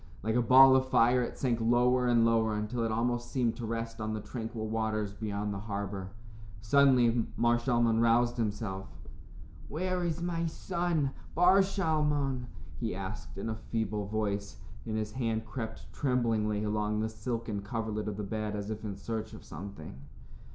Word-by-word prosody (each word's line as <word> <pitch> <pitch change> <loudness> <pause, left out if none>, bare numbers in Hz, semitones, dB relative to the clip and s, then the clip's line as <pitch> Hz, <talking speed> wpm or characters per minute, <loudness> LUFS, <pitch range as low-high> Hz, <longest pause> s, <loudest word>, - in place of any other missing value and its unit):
Like 110 +1 0
a 120 - +3
ball 130 +3 +8
of 130 0 +2
fire 125 +1 +4
it 120 - -4
sank 120 -3 0
lower 125 +2 +3
and 120 -1 +4
lower 110 -1 +2
until 105 +3 -2
it 115 - 0
almost 120 +1 -1
seemed 120 -4 0
to 120 -2 -4
rest 115 0 -4
on 110 0 -2
the - - -3
tranquil 110 +1 -5
waters 110 -2 -1
beyond 105 -1 -3
the 100 - -4
harbor. 100 -2 -4 0.5
Suddenly, 120 -1 +4
Mar 120 +1 +3
Shalmon 120 -2 +2
roused 120 +1 +3
himself. 105 -3 -2 0.8
"Where 180 +4 -1
is 170 -1 -1
my 170 -1 -1
son, 170 -4 -1 0.2
Bar 180 +4 +6
Shalmon?" 150 -9 0 0.3
he 115 -6 -2
asked 95 -1 -6
in 100 - -4
a 110 0 -4
feeble 110 -3 -1
voice, 100 -1 -2 0.3
and 110 -1 -1
his 110 -1 -2
hand 115 -2 -1
crept 110 +1 -7
tremblingly 115 -6 +1
along 105 0 0
the 110 - 0
silken 110 -1 -4
coverlet 110 0 -3
of 105 -2 -3
the 105 - -3
bed 105 +1 -3
as 105 +1 -4
if 110 0 -5
in 105 -2 -4
search 110 -1 -4
of - - -10
something. 85 -6 -8
115 Hz, 170 wpm, -31 LUFS, 105-125 Hz, 0.8 s, ball